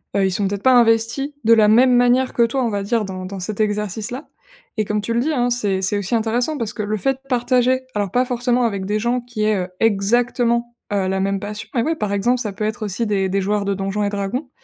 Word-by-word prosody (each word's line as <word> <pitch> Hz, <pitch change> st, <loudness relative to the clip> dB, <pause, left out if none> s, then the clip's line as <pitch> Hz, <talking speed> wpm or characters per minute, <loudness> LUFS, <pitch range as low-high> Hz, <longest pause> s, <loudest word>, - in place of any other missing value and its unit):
heu, 200 Hz, -1 st, +3 dB
ils 190 Hz, -, +1 dB
sont 195 Hz, +1 st, 0 dB
peut-être 200 Hz, 0 st, -4 dB
pas 260 Hz, -, +5 dB
investis 235 Hz, +4 st, +3 dB
de 230 Hz, -, +5 dB
la 215 Hz, -2 st, +5 dB
même 250 Hz, +4 st, +5 dB
manière 245 Hz, +1 st, +3 dB
que 235 Hz, -, +3 dB
toi, 255 Hz, +3 st, 0 dB
on 235 Hz, -, 0 dB
va 200 Hz, -2 st, -2 dB
dire, 220 Hz, +2 st, 0 dB
dans 185 Hz, -2 st, -6 dB
dans 195 Hz, +1 st, -6 dB
cet 205 Hz, +3 st, -5 dB
exercice-là. 210 Hz, -, -2 dB, 0.5 s
Et 215 Hz, -, +1 dB
comme 210 Hz, +1 st, -1 dB
tu 230 Hz, +3 st, -2 dB
le 235 Hz, -, +1 dB
dis, 305 Hz, +6 st, 0 dB
hein, 245 Hz, -3 st, +1 dB
c'est 205 Hz, -6 st, 0 dB
c'est 200 Hz, +2 st, 0 dB
aussi 200 Hz, +3 st, -1 dB
intéressant 240 Hz, +7 st, 0 dB
parce 230 Hz, -5 st, -2 dB
que 215 Hz, -, -4 dB
le 210 Hz, +1 st, -1 dB
fait 270 Hz, +6 st, +1 dB
de -, -, -27 dB
partager- 250 Hz, 0 st, +2 dB
alors 205 Hz, -3 st, -1 dB
pas 250 Hz, +1 st, +2 dB
forcément 245 Hz, 0 st, 0 dB
avec 200 Hz, -5 st, -1 dB
des 210 Hz, +2 st, -1 dB
gens 240 Hz, +3 st, 0 dB
qui 240 Hz, -3 st, -4 dB
aient, 215 Hz, -1 st, +2 dB
heu, -, -, -10 dB
exactement, 235 Hz, +3 st, +1 dB, 0.2 s
heu, 195 Hz, -2 st, 0 dB
la 190 Hz, 0 st, -1 dB
même 195 Hz, 0 st, -1 dB
passion- 210 Hz, +1 st, -6 dB
mais 235 Hz, -, +2 dB
oui 325 Hz, +5 st, 0 dB
par 210 Hz, -8 st, -2 dB
exemple, 240 Hz, +6 st, +1 dB
ça 215 Hz, -5 st, -4 dB
peut 215 Hz, -, -5 dB
être 215 Hz, 0 st, -2 dB
aussi 205 Hz, +4 st, -2 dB
des 195 Hz, -2 st, 0 dB
des 195 Hz, +1 st, 0 dB
joueurs 205 Hz, +1 st, -1 dB
de 200 Hz, -, 0 dB
Donjons& 195 Hz, +2 st, -2 dB
Dragons, 205 Hz, +7 st, -3 dB
220 Hz, 260 wpm, -20 LUFS, 200-245 Hz, 0.5 s, pas